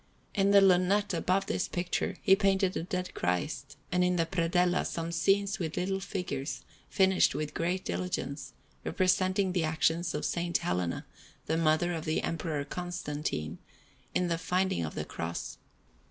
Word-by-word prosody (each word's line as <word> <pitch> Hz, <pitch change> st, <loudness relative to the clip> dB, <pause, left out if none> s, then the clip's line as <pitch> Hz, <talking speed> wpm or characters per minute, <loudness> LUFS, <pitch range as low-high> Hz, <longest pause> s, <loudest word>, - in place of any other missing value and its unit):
In 195 Hz, 0 st, +3 dB
the 200 Hz, 0 st, +7 dB
lunette 195 Hz, +2 st, +4 dB
above 185 Hz, +3 st, +1 dB
this 185 Hz, -, -1 dB
picture 175 Hz, +1 st, -2 dB
he 195 Hz, -, +7 dB
painted 195 Hz, -2 st, +2 dB
a -, -, -1 dB
Dead 180 Hz, +1 st, -3 dB
Christ, 90 Hz, 0 st, -2 dB
and 180 Hz, 0 st, +3 dB
in 180 Hz, 0 st, +2 dB
the 165 Hz, -1 st, +2 dB
predella 175 Hz, +1 st, +2 dB
some 165 Hz, 0 st, -3 dB
scenes 200 Hz, +4 st, +2 dB
with 165 Hz, -3 st, -3 dB
little 190 Hz, +1 st, 0 dB
figures, 175 Hz, -8 st, -4 dB, 0.3 s
finished 190 Hz, -1 st, +3 dB
with 150 Hz, -1 st, -3 dB
great 180 Hz, +2 st, -1 dB
diligence, 90 Hz, +1 st, -3 dB, 0.3 s
representing 185 Hz, +1 st, +2 dB
the 180 Hz, -2 st, +1 dB
actions 160 Hz, +2 st, +1 dB
of 150 Hz, -, -1 dB
S. -, -, 0 dB, 0.2 s
Helena, 90 Hz, -1 st, -2 dB, 0.4 s
the 160 Hz, -, 0 dB
mother 165 Hz, +2 st, +2 dB
of 160 Hz, -2 st, -4 dB
the 155 Hz, -, 0 dB
Emperor 155 Hz, -3 st, -2 dB
Constantine, 150 Hz, -, -4 dB, 0.6 s
in 180 Hz, -, +2 dB
the 165 Hz, -1 st, 0 dB
finding 180 Hz, -, 0 dB
of 80 Hz, -, -5 dB
the -, -, -3 dB
Cross. 85 Hz, +1 st, -5 dB
175 Hz, 155 wpm, -30 LUFS, 155-190 Hz, 0.6 s, the